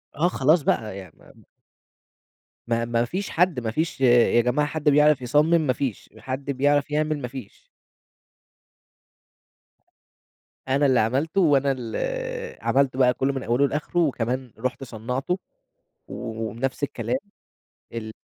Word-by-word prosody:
آه، 165 +5 +2
خلاص 155 0 +3
بقى 110 -7 -1
يعني، 95 -5 -11
فاهم؟ - - -19 1.2
ما 115 0 0
ما 120 0 0
فيش 190 +10 -4
حد 175 -5 +2
ما 110 -2 -3
فيش 160 +1 -2
يا 120 -1 +5
جماعة 130 +5 +1
حد 155 -1 0
بيعرف 150 -1 +4
يصمِّم 150 +7 +3
ما 130 -5 +1
فيش، 125 -4 -4
حد 130 +4 -5
بيعرف 145 +2 +1
يعمل 155 0 0
ما 125 - -3
فيش. 135 - -11 2.9
أنا 140 +2 +2
اللي 130 -2 +4
عملتُه 140 - +1
وأنا 140 -4 +3
ال 115 -3 -6 0.7
عملتُه 135 -1 +1
بقى 125 -1 +5
كله 135 +2 -1
من 135 - -4
أوله 125 +4 +2
لآخره، 150 +5 -2
وكمان 130 -5 -1
رُحت 130 +2 -3
صنّعته 125 - -3 0.7
و - - -9 0.4
وبنفس 130 +6 -4
الكلام 195 - -1 0.8
ال 110 -2 -6
135 Hz, 135 wpm, -24 LUFS, 120-150 Hz, 2.9 s, يا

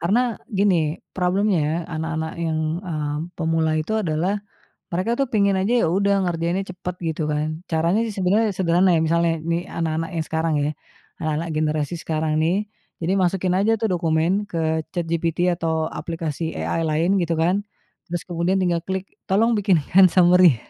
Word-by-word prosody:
Karena 225 +7 +1
gini 185 -7 +1 0.2
problemnya, 180 -4 +1
anak-anak 160 -1 -3
yang, 160 -2 -1 0.2
eee, 155 -5 -3 0.2
pemula 160 -1 +1
itu 155 +8 -2
adalah 180 +3 -1 0.5
mereka 185 +6 0
tuh 275 - +2
pingin 200 -2 +3
aja, 195 +5 +1
ya - - +1
udah 200 +2 +2
ngerjainnya 175 +2 -1
cepet 180 -1 -5 0.2
gitu 155 0 -3
kan, 155 +1 -2
caranya 165 +5 +1
sih 215 - -6
sebenarnya 200 +2 +2
sederhana 180 0 +3
ya, 160 - +3
misalnya 170 +1 +2
ini 170 +2 -1
anak-anak 165 0 -2
yang 160 - 0
sekarang 160 0 -1
ya, 145 - +1 0.5
anak-anak 155 +1 -2
generasi 155 0 -1
sekarang 155 -1 -1
nih, 165 +3 +2 0.5
jadi 180 +4 +1
masukin 185 0 +1
aja 220 +3 +3
tuh 220 -2 -1
dokumen 175 +4 +1
ke 160 -1 -1
ChatGPT 170 +1 0
atau 160 -1 -1
aplikasi 160 0 -4
AI 165 -1 -1
lain 165 +6 +2
gitu 170 -2 0
kan, 180 +6 +1 0.4
terus 175 -1 -4
kemudian 175 +1 -1
tinggal 175 -1 +1
klik 190 +3 -5 0.2
tolong 220 +3 +3
bikinkan 190 -1 +5
summary. 180 -3 +6
170 Hz, 155 wpm, -22 LUFS, 160-190 Hz, 0.5 s, summary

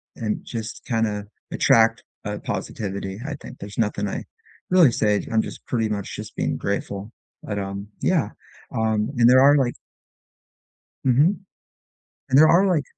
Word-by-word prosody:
and 110 -2 -3
just 115 -2 -6
kinda 110 -4 -1 0.3
attract, 115 0 +4 0.2
uh, - - -3
positivity, 100 -1 -4
I 150 -1 -4
think. - - -12
There's 100 +1 -9
nothing 105 -2 0
I - - -5 0.5
really 175 -9 +6
say, 105 -3 +1
I'm 110 -1 +3
just - - -9
pretty 115 -3 0
much 100 -2 -4
just - - -8
being - - -1
grateful, 100 +1 -3 0.3
but, 100 -1 -3
um, 100 +1 -5
yeah, - - +2 0.4
um, 110 +1 0
and 120 0 +6
there 130 - +7
are, 145 +1 +7
like 125 -3 +1 1.3
Mhm, 145 +10 +4 0.9
and 130 - +4
there 155 - +8
are, 185 +4 +5
like 165 -6 +2
110 Hz, 155 wpm, -23 LUFS, 105-130 Hz, 1.3 s, there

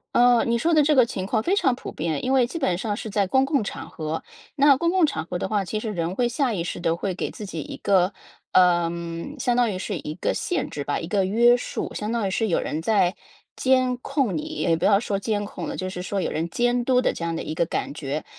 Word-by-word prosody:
呃， 245 -1 +5
你 235 0 +1
说 330 +8 +1
的 305 -2 +5
这 300 +2 +3
个 255 -4 +6
情 190 -5 -4
况 220 +2 0
非 360 - +1
常 265 - +2
普 245 - -7
遍。 155 -2 -2
因 260 - +1
为 260 -2 +5
基 260 +8 -5
本 185 - +1
上 205 +1 -2
是 220 - -5
在 200 -1 +1
公 265 +7 +3
共 280 -4 +1
场 - - -6
合。 155 0 -4 0.3
那 285 -1 +6
公 335 +6 0
共 370 -2 +4
场 285 - -3
合 175 +1 -4
的 - - -2
话， 205 0 0
其 215 +3 -3
实 220 - -4
人 170 0 -2
会 245 +2 +2
下 250 0 0
意 175 -5 -2
识 175 - -5
的 165 -1 +1
会 190 +2 -2
给 - - -3
自 210 - -8
己 165 -5 -5
一 - - -7
个， 190 -1 +2 0.4
呃， 175 -2 +4 0.5
相 245 -1 +1
当 240 -2 +3
于 185 - -4
是 195 0 -3
一 150 0 -5
个 - - -1
限 355 - -2
制 145 - -5
吧， 145 - -1
一 165 - -6
个 195 +2 +1
约 235 +6 +5
束。 245 - -4
相 210 +1 -3
当 230 -4 0
于 - - -2
是 225 +4 0
有 165 - +2
人 155 - -3
在 190 -1 +2 0.4
监 255 -1 +2
控 260 - 0
你 155 - -1
也 160 +2 0
不 165 - -5
要 200 0 +5
说 205 -3 -2
监 205 0 -1
控 - - -6
了， - - -5
就 185 - -3
是 180 -1 -6
说 195 +2 -2
有 - - -1
人 165 +2 -2
监 245 +4 +1
督 250 0 +3
的， - - +1
这 - - -6
样 170 0 -1
的 - - -3
一 155 - -4
个 170 - +2
感 165 - -3
觉。 145 0 -4
205 Hz, 295 characters per minute, -24 LUFS, 175-245 Hz, 0.5 s, 个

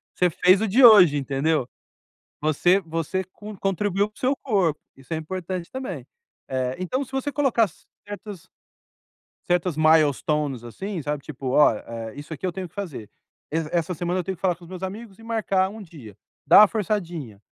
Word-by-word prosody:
você 180 -1 +3
fez 185 +5 +4
o 220 - +1
de 245 +6 +6
hoje, 180 -10 +8
entendeu? 140 0 0 0.7
Você 165 +5 +3
você 165 +3 -3
con-contribuiu 205 0 -2
para 210 - -40
o - - -15
seu 265 +2 +1
corpo. 190 - 0 0.2
Isso 135 +4 -8
é - - -1
importante 180 +1 -5
também. 190 - -5 0.5
Eh, 130 -1 -1
então, 255 +10 -2
se 265 - -19
você 270 +2 -2
colocar 255 -7 +2 0.4
certas 205 -3 -8 1.0
certas 175 -3 +1
milestones, 150 -4 +2
assim, 185 - -6
sabe? 150 -1 -3
Tipo: 135 -3 -6
“Ó, 150 - +6
hã, 115 0 -7
isso 150 +3 -8
aqui 185 - -5
eu 180 - -2
tenho 185 0 -6
que - - -33
fazer. 160 - -6 0.4
E 160 - -2 0.2
essa 175 +1 0
semana 175 +2 -2
eu - - -5
tenho 190 0 -4
que - - -31
falar 180 -2 +2
com 170 +1 -16
os - - -14
meus 185 0 -8
amigos 200 +2 -7
e - - -15
marcar 195 -4 0
um 220 +1 -10
dia”. 140 - -12 0.3
Dar - - +8
uma 210 - +8
forçadinha. 170 - -3
175 Hz, 185 wpm, -24 LUFS, 150-200 Hz, 1.0 s, hoje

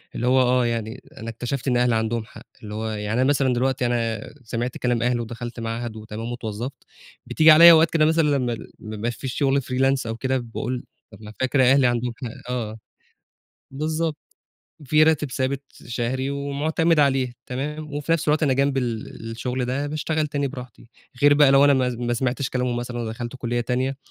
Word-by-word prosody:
اللي 125 - -1
هو 130 +1 +5
آه، 125 -1 +3
يعني 115 +1 -3 0.2
أنا 115 +1 -6
اكتشفت 120 +4 -4
إن 125 -1 +2
أهلي 120 -1 +2
عَندهم 110 0 -1
حق، - - -14 0.2
اللي 105 0 -7
هو 110 +1 -3
يعني 105 0 -3
أنا 130 - +3
مثلًا 135 -3 +2
دلوقتي 125 0 0
أنا 115 -2 -1
سمعت 120 +2 -3
كلام 120 -2 0
أهلي 125 -1 +1
ودخَلت 120 +1 -6
معهد 115 0 -4
وتمام 110 +2 -6
واتوظّفت، 120 +2 -6 0.4
بتيجي 155 0 +5
عليَّ 170 +2 +10
أوقات 160 0 +6
كده 155 -1 +3
مثلًا، 160 +1 +3
لما 125 -4 +1
ال 110 - -9
ما 110 0 -7
يبقاش 115 +2 -3
في 135 - -6
شغل 135 +1 +1
freelance 135 0 +1
أو 115 - -3
كده، 130 +2 -1
باقول 120 +1 -4 0.3
بابقى 105 0 -11
فاكر 130 +1 +2
أهلي 135 -2 +5
عندهم 120 0 -1
حق. 125 +1 -7
آه، 110 -3 -4 0.9
بالضبط، 155 +2 -2 0.7
في 155 +3 +4
راتب 155 -3 +2
ثابت 135 +1 -2 0.2
شهري 125 +3 -2
ومُعتمِد 150 +4 0
عليه، 135 -3 +2
تمام، 150 +3 -5
وفي 150 +3 -1
نفس 165 -1 0
الوقت 150 +2 +2
أنا 140 -3 +3
جنب 135 +1 +1
ال 115 -2 -4
الشغل 125 +2 -3
ده 135 +4 -2
باشتغل 155 +1 -1
تاني 145 -1 -2
براحتي، 125 -3 -10 0.3
غير 145 0 +7
بقى 145 -2 +6
لو 135 +1 +6
أنا 145 - +6
ما 130 -1 +2
ما 120 0 -2
سمَعتش 130 +2 -1
كلامهم 125 -1 -1
مثلًا 120 0 -4
ودخَلت 120 +2 -5
كُلّية 120 -1 -2
تانية 130 +3 -1
125 Hz, 190 wpm, -23 LUFS, 120-140 Hz, 0.9 s, عليَّ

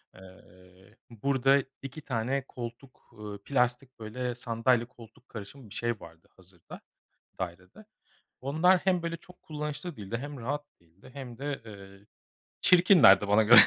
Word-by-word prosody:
Iıı, 95 +2 -17
burada 135 +3 +2 0.2
2 135 +3 -7
tane 130 +1 -1
koltuk, 120 +2 -9
ııı, 100 -1 -7
plastik, 125 -1 0
böyle, 120 +3 -4
sandalye 120 0 +1
koltuk 120 0 -17
karışımı 110 +2 -9
bir - - -10
şey 120 -2 -1
vardı 80 -1 -14
hazırda, 90 -2 -13 0.6
dairede. 90 - -7 0.6
Onlar 160 +7 +4
hem 180 -3 +1
böyle 170 0 -2
çok 180 +1 -18
kullanışlı 150 +2 -5
değildi 105 +3 -4
hem 145 +1 -7
rahat 145 +5 -3 0.2
değildi 85 +9 -19
hem 125 -4 -8
de, 145 -2 -3
ııı, 100 -1 -12 0.6
çirkinlerdi 175 - +7
bana 105 +2 +5
göre 120 +3 +10
120 Hz, 135 wpm, -29 LUFS, 100-140 Hz, 0.6 s, göre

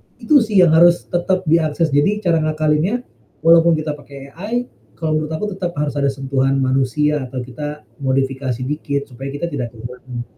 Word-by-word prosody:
itu 300 -3 +4
sih 210 -5 +4
yang 170 - +5
harus 175 +2 +5
tetap 185 +1 0
diakses, 160 -1 +1
jadi 200 +10 +2
cara 165 -2 +3
ngakalinnya 155 +9 0 0.4
walaupun 165 0 +6
kita 155 -1 -2
pakai 140 -1 -12
AI, 220 +8 -3 0.3
kalau 155 -1 0
menurut 155 +1 -5
aku 210 - -3
tetap 175 -2 -4
harus 145 -1 -1
ada 140 - +2
sentuhan 135 0 0
manusia 135 +2 +1
atau 125 0 -5
kita 150 +4 -7 0.2
modifikasi 135 -2 -1
dikit 140 0 -3
supaya 130 +3 -7
kita 170 +4 -3
tidak 120 -4 -4
kehilangan 120 +1 -7
150 Hz, 170 wpm, -19 LUFS, 135-170 Hz, 0.4 s, walaupun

